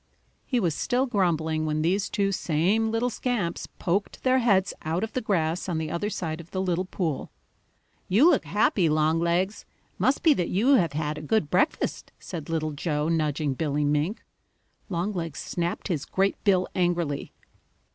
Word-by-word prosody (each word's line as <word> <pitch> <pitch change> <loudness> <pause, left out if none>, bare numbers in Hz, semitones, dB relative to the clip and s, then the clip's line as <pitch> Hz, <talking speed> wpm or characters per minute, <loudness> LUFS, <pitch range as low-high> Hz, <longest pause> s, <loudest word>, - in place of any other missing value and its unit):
He 250 - +1
was 175 -7 +1
still 250 - 0
grumbling 160 - 0
when 155 0 0
these 190 +4 +1
two 200 -1 0
same 190 +5 +1
little 230 +2 0
scamps 210 -8 -2
poked 195 +3 -2
their 260 0 +4
heads 200 -6 +2
out 165 +5 -1
of 225 - -4
the 255 - -1
grass 175 -4 0
on 170 - -1
the 160 -1 -3
other 190 +5 -1
side 170 -5 -4
of 170 - -16
the 185 - -3
little 185 -1 0
pool. 170 -6 -3 0.8
"You 225 - +5
look - - +4
happy, 195 -4 +2
Longlegs. 170 +5 +1 0.4
Must 265 - +2
be 320 - +7
that 175 -9 -1
you 215 +8 +2
have 170 - +3
had 150 0 -2
a - - -8
good 155 -1 0
breakfast," 185 - 0
said 165 -5 -7
Little 155 -1 -1
Joe, 150 +1 -1
nudging 150 -3 0
Billy 150 +1 -1
Mink. 150 +8 0 0.7
Longlegs 170 -4 -2
snapped 175 0 -3
his 165 -8 -2
great 195 +1 0
bill 185 -3 +3
angrily. 175 -5 -1
175 Hz, 165 wpm, -26 LUFS, 155-205 Hz, 0.8 s, be